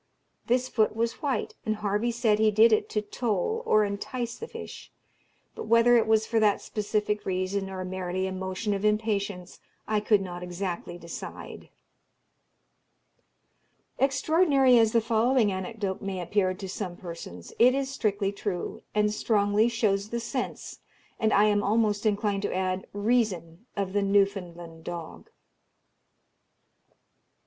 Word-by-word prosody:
This 250 Hz, +2 st, +2 dB
foot 220 Hz, -4 st, +1 dB
was 230 Hz, +1 st, -2 dB
white, 270 Hz, -8 st, -1 dB
and 215 Hz, -, -1 dB
Harvey 210 Hz, +2 st, -1 dB
said 225 Hz, -3 st, +1 dB
he 220 Hz, 0 st, +5 dB
did 220 Hz, +2 st, +5 dB
it 215 Hz, -, +1 dB
to 210 Hz, -, -1 dB
toll 225 Hz, -, -1 dB
or 215 Hz, 0 st, +4 dB
entice 230 Hz, +4 st, -4 dB
the 460 Hz, -, -7 dB
fish; -, -, -9 dB, 0.6 s
but -, -, -7 dB
whether 230 Hz, +2 st, +5 dB
it 230 Hz, -, +3 dB
was 220 Hz, 0 st, +3 dB
for 225 Hz, 0 st, +1 dB
that 210 Hz, -2 st, +3 dB
specific 210 Hz, 0 st, -2 dB
reason, 190 Hz, +1 st, -2 dB
or 185 Hz, -1 st, -5 dB
merely 185 Hz, 0 st, -3 dB
a 190 Hz, -, -3 dB
motion 190 Hz, +3 st, -3 dB
of 200 Hz, 0 st, -3 dB
impatience, 205 Hz, -4 st, -1 dB, 0.3 s
I 215 Hz, -1 st, +1 dB
could 210 Hz, -1 st, +3 dB
not 175 Hz, -2 st, -6 dB
exactly 180 Hz, -1 st, -5 dB
decide." 170 Hz, -1 st, -9 dB, 2.3 s
Extraordinary 275 Hz, -2 st, +4 dB
as 225 Hz, -1 st, +4 dB
the 230 Hz, -, +3 dB
following 230 Hz, 0 st, +2 dB
anecdote 190 Hz, +1 st, -4 dB
may 195 Hz, -1 st, -4 dB
appear 185 Hz, +1 st, 0 dB
to 195 Hz, 0 st, -7 dB
some 185 Hz, -2 st, -5 dB
persons, 165 Hz, -, -9 dB
it 250 Hz, +3 st, +6 dB
is 275 Hz, -1 st, -1 dB
strictly 205 Hz, -6 st, 0 dB
true, 200 Hz, -3 st, -4 dB
and 210 Hz, 0 st, +2 dB
strongly 210 Hz, +1 st, +2 dB
shows 210 Hz, -4 st, 0 dB
the 235 Hz, -, -2 dB
sense, 245 Hz, +2 st, -5 dB, 0.4 s
and 220 Hz, -1 st, +2 dB
I 205 Hz, -, +5 dB
am 205 Hz, -1 st, +3 dB
almost 210 Hz, 0 st, +1 dB
inclined 205 Hz, -1 st, 0 dB
to 205 Hz, -, -2 dB
add, 185 Hz, 0 st, -1 dB
reason 205 Hz, -4 st, -1 dB
of 195 Hz, -1 st, -2 dB
the 205 Hz, -, +2 dB
Newfoundland 180 Hz, -5 st, 0 dB
dog. 170 Hz, -2 st, -7 dB
210 Hz, 145 wpm, -27 LUFS, 190-225 Hz, 2.3 s, it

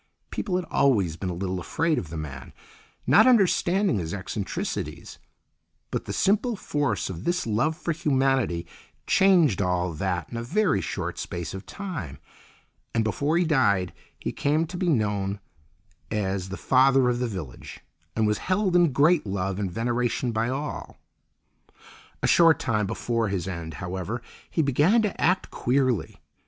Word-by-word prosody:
People 185 Hz, -, -2 dB
had 180 Hz, -1 st, -1 dB
always 100 Hz, -, +2 dB
been 90 Hz, +2 st, -4 dB
a -, -, -2 dB
little 95 Hz, +1 st, -3 dB
afraid 160 Hz, -, 0 dB
of 85 Hz, -, -7 dB
the 80 Hz, -, -6 dB
man, 70 Hz, -4 st, -7 dB, 0.5 s
not 220 Hz, +4 st, +6 dB
understanding 195 Hz, -, +3 dB
his 80 Hz, +1 st, -3 dB
eccentricities, 100 Hz, 0 st, -4 dB, 0.7 s
but -, -, -2 dB
the -, -, -5 dB
simple 215 Hz, +4 st, +1 dB
force 145 Hz, -, -1 dB
of 95 Hz, -1 st, -6 dB
this 175 Hz, +1 st, 0 dB
love 120 Hz, +9 st, 0 dB
for 175 Hz, -, -2 dB
humanity 135 Hz, -, +1 dB, 0.4 s
changed 175 Hz, -, +4 dB
all 90 Hz, -2 st, 0 dB
that 90 Hz, 0 st, -2 dB
in 120 Hz, -, -4 dB
a 115 Hz, -, -3 dB
very 165 Hz, -, +1 dB
short -, -, -4 dB
space 85 Hz, -4 st, -5 dB
of 95 Hz, +1 st, -8 dB
time; 160 Hz, -, -6 dB, 0.8 s
and 115 Hz, -, +3 dB
before 140 Hz, -, 0 dB
he 175 Hz, -, +2 dB
died 100 Hz, -, +2 dB, 0.2 s
he -, -, -4 dB
came 150 Hz, +3 st, +1 dB
to 165 Hz, -, -9 dB
be 180 Hz, 0 st, 0 dB
known 105 Hz, -6 st, 0 dB, 0.7 s
as 95 Hz, -3 st, -2 dB
the 95 Hz, -, -5 dB
Father 135 Hz, 0 st, +4 dB
of 120 Hz, 0 st, +1 dB
the 125 Hz, -, 0 dB
Village 95 Hz, -, -8 dB, 0.3 s
and 110 Hz, -, +2 dB
was 105 Hz, 0 st, +1 dB
held 185 Hz, -1 st, 0 dB
in 175 Hz, -4 st, +5 dB
great 150 Hz, +1 st, +3 dB
love 95 Hz, 0 st, -2 dB
and 100 Hz, -2 st, -1 dB
veneration 120 Hz, +4 st, -1 dB
by 115 Hz, +1 st, 0 dB
all. 140 Hz, +3 st, -5 dB, 1.3 s
A -, -, +3 dB
short 165 Hz, -2 st, +6 dB
time 105 Hz, -4 st, 0 dB
before 115 Hz, +2 st, -1 dB
his 95 Hz, -3 st, -2 dB
end, 85 Hz, -4 st, -5 dB
however, 95 Hz, -, -4 dB, 0.3 s
he 160 Hz, -, +1 dB
began 150 Hz, -, +3 dB
to 210 Hz, -, -2 dB
act 180 Hz, +2 st, +2 dB
queerly. 130 Hz, -3 st, 0 dB
120 Hz, 160 wpm, -26 LUFS, 95-160 Hz, 1.3 s, not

